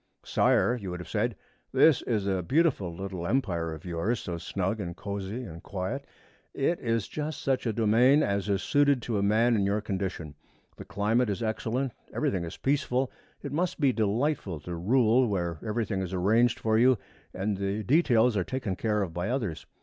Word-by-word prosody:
'Sire,' 120 - +3
you 95 - -5
would 90 0 -5
have 90 - -8
said, 115 +1 -1 0.4
'this 160 -5 +5
is 110 -5 -1
a 95 -2 0
beautiful 130 - +1
little 90 0 -5
empire 85 -10 0
of 80 +1 -8
yours, 90 +7 -1
so 85 - -4
snug 95 +5 -2
and 85 -4 -4
cosy 100 +4 -4
and 85 -7 -9
quiet. 105 +9 -4 0.5
It 155 +5 +1
is 115 -3 -1
just 155 -1 -4
such 130 -2 0
a - - +2
domain 115 +7 +4
as 100 0 -1
is 100 -1 0
suited 145 -2 +3
to 110 -4 -1
a - - 0
man 110 +4 +3
in 100 - +2
your 100 +2 +1
condition. 95 -7 -4 0.4
The - - -9
climate 110 +4 +1
is 100 +3 -2
excellent. 115 +4 -1 0.2
Everything 90 -3 -1
is 80 - -8
peaceful. 135 -2 0 0.3
It 140 - -5
must 170 +4 -1
be 140 -4 +3
delightful 110 - 0
to 90 +3 -6
rule 120 +6 +3
where 85 -6 -2
everything 110 -3 -1
is 95 0 -3
arranged 110 +6 +3
for 110 0 +2
you 125 +1 +5 0.3
and 100 +2 -2
the 100 +2 -2
details 125 - +3
are 95 - +1
taken 125 -4 -3
care 105 0 0
of 85 -4 -5
by 90 +4 -2
others. 105 - -3
105 Hz, 190 wpm, -28 LUFS, 95-125 Hz, 0.5 s, this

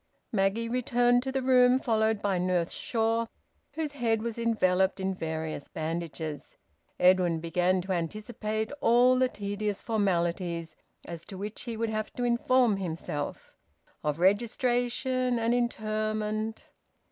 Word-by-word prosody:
Maggie 210 +2 +1
returned 245 0 +2
to 265 +1 -3
the 265 -1 -1
room, 250 -1 +5
followed 220 -4 +1
by 195 -3 +1
Nurse 180 -1 0
Shaw, 230 0 0 0.5
whose 315 -2 -3
head 230 -5 0
was 235 0 -4
enveloped 190 -5 +2
in 190 0 -1
various 160 -4 -4
bandages. 160 -1 -5 0.4
Edwin 180 -2 +4
began 180 +3 +1
to 190 +2 -5
anticipate 215 +5 -3
all 245 +2 +5
the 255 -1 +3
tedious 205 -1 -3
formalities, 175 -6 -1 0.3
as 170 -1 -7
to 190 - -9
which 205 +3 -5
he 235 -2 -4
would 225 0 -1
have 215 0 -3
to 245 - -3
inform 240 -2 +3
himself, 160 -5 -4 0.5
of 150 0 0
registration 245 +5 +1
and 230 +1 +1
interment... 215 -2 -2
215 Hz, 130 wpm, -29 LUFS, 180-235 Hz, 0.5 s, room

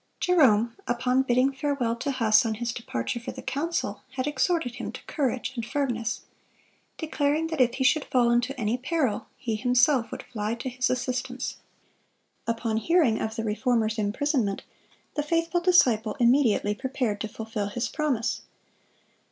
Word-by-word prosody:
Jerome, 235 -10 +4
upon 250 +2 +2
bidding 260 +1 +2
farewell 270 -4 -1
to 280 - -3
Huss 225 -5 +4
on 225 -2 -1
his 235 +1 -3
departure 230 - -3
for 230 - -6
the - - -9
council, 260 -7 -2
had 255 -1 -2
exhorted 295 -3 0
him 240 - -4
to - - -9
courage 260 -5 -1
and 235 - -3
firmness, 235 -3 -2 0.8
declaring 310 -1 0
that 320 -4 0
if 245 -1 +3
he 265 - -1
should 290 +2 +3
fall 240 -2 +3
into 250 +3 0
any 225 +2 0
peril, 270 -4 -1
he 225 -3 -2
himself 250 +2 +3
would - - -6
fly 220 -2 -3
to 235 +2 -4
his 250 0 0
assistance. 255 0 -2 0.9
Upon 225 -1 -1
hearing 300 -3 +3
of 220 0 -3
the 225 - -3
Reformer's 225 0 0
imprisonment, 215 0 0 0.5
the 295 - 0
faithful 335 +3 0
disciple 245 - +3
immediately 235 -4 +3
prepared 250 -4 -2
to 220 - -2
fulfil 220 -1 -4
his 235 +4 -2
promise. 285 -7 -1
245 Hz, 155 wpm, -26 LUFS, 225-275 Hz, 0.9 s, Jerome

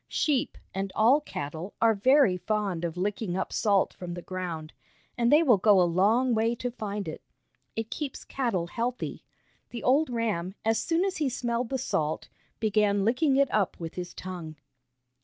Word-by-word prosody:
Sheep, 285 -5 0 0.2
and 195 0 -3
all 245 +7 +5
cattle, 160 - -6
are 225 0 +5
very 255 0 +4
fond 190 -2 -2
of 170 0 -3
licking 195 0 -2
up - - -3
salt 200 -3 +2
from 175 -1 -7
the 175 - -7
ground, 170 -4 -5 0.4
and 235 -1 +2
they 305 +3 +6
will 240 - +5
go 205 0 +5
a - - +6
long 210 +9 +3
way 225 +1 +1
to 245 +1 -3
find 205 -3 -4
it. - - -6 0.5
It 225 0 -4
keeps 295 -3 -4
cattle 230 -10 -1
healthy. 235 +7 -3 0.5
The 235 - -7
old 280 +4 +3
ram, 210 -6 -2
as 225 0 +2
soon 335 +3 +1
as 390 - -2
he 300 -3 +1
smelled 240 -1 -2
the 265 - -1
salt, 160 -11 -2 0.3
began 205 -2 +2
licking 265 +5 +2
it 275 -1 +2
up 205 -3 +1
with 165 -1 -6
his 180 -1 -6
tongue. 175 -4 -7
215 Hz, 175 wpm, -28 LUFS, 185-245 Hz, 0.5 s, they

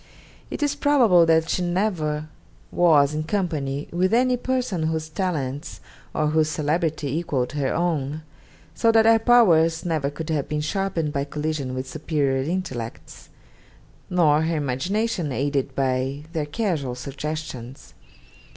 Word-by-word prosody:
It - - -3
is 290 -1 +1
probable 245 - +4
that 160 0 +3
she - - 0
never 175 -5 -1 0.4
was 150 -5 +4
in 155 0 -2
company 155 -7 -2
with 185 +5 +2
any 250 +1 +3
person 245 -10 -1
whose 160 -1 -2
talents 150 -5 -3 0.3
or 150 -1 0
whose 155 0 +2
celebrity 155 -2 -1
equalled 140 -7 -1
her 145 -3 -1
own; 155 -3 -1 0.5
so 230 - +3
that 225 -1 +5
her 225 0 +6
powers 170 -10 +4
never 155 -5 0
could 160 +2 -6
have 145 -3 -1
been 150 0 -1
sharpened 165 -2 -1
by 140 -1 -1
collision 150 -3 -3
with 130 0 -4
superior 145 -3 -1
intellects, 135 -8 -5 0.8
nor 155 -4 +3
her 165 +1 0
imagination 165 - -1
aided 140 0 -1
by 135 +1 -1
their 155 -3 -2
casual 150 - -2
suggestions. 140 -1 -6
155 Hz, 135 wpm, -23 LUFS, 140-180 Hz, 0.8 s, her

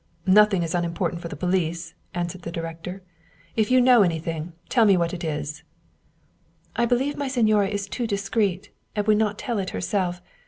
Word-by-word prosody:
" - - -36 0.2
Nothing 200 -4 +2
is 165 - -3
unimportant 170 0 -1
for 170 - -5
the 155 - -7
police," 170 0 -1 0.2
answered 175 +1 -3
the 170 - -6
director. 165 +3 -6 0.3
" 170 0 -31
If 220 -2 +1
you 255 0 +5
know 250 -2 +6
anything, 165 -2 -1
tell 235 - +3
me 200 -3 +5
what 170 0 0
it 175 0 -5
is." 150 -1 -3 0.6
" - - -39 0.3
I 235 - +2
believe 260 +4 +1
my 285 -1 -2
signora 215 -6 +3
is 200 0 -3
too 235 +4 -3
discreet, 200 -2 -1 0.2
and 210 -1 0
would 215 -1 +4
not 215 -1 +1
tell 235 -5 -2
it 190 - -2
herself. 180 -3 -1
185 Hz, 195 wpm, -24 LUFS, 170-215 Hz, 0.6 s, know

